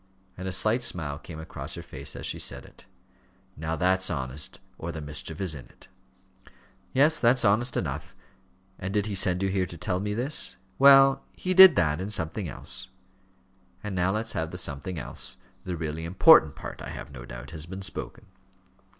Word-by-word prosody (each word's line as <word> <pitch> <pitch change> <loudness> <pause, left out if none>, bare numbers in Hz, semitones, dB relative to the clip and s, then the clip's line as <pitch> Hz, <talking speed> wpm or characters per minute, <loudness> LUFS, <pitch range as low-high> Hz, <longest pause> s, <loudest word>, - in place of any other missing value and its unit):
And 95 +1 -6
a - - -2
slight 110 +6 +1
smile 75 -11 -1
came 80 -1 -10
across 80 - -7
her - - -7
face - - -6
as - - -7
she - - -3
said - - -4
it. - - -18 0.7
"Now 80 +1 -3
that's 95 +3 +1
honest, 65 +1 -3 0.2
or - - -4
the 80 - -6
mischief 75 +2 -5
is 95 -5 -1
in 65 -4 -9
it." - - -19 1.0
"Yes, 150 +4 +3
that's 120 +1 +3
honest 120 +5 +2
enough. 70 -2 -4 0.6
And 95 +2 -4
did 105 -1 +2
he 105 - -3
send 95 -1 +2
you 95 - +1
here 95 -1 0
to 85 - -9
tell 90 +2 -2
me 105 +1 -2
this?" 125 -4 +1 0.2
"Well, 135 0 +7
he 185 - -2
did 190 -3 +10
that, 75 -2 +1
and 100 +2 -4
something 85 0 -2
else." 95 - -3 1.0
"And 105 -2 -4
now 90 0 +1
let's 110 +3 -1
have 80 -1 -2
the 90 - -7
something 85 +1 -3
else. 70 - -1 0.3
The 90 -2 -3
really 80 0 -4
important 85 -3 +6
part, - - -8
I - - -7
have - - -8
no 65 -3 -9
doubt, - - -9
has 80 -1 -7
been 95 +2 -7
spoken." 110 +3 -6
90 Hz, 190 wpm, -27 LUFS, 80-105 Hz, 1.0 s, did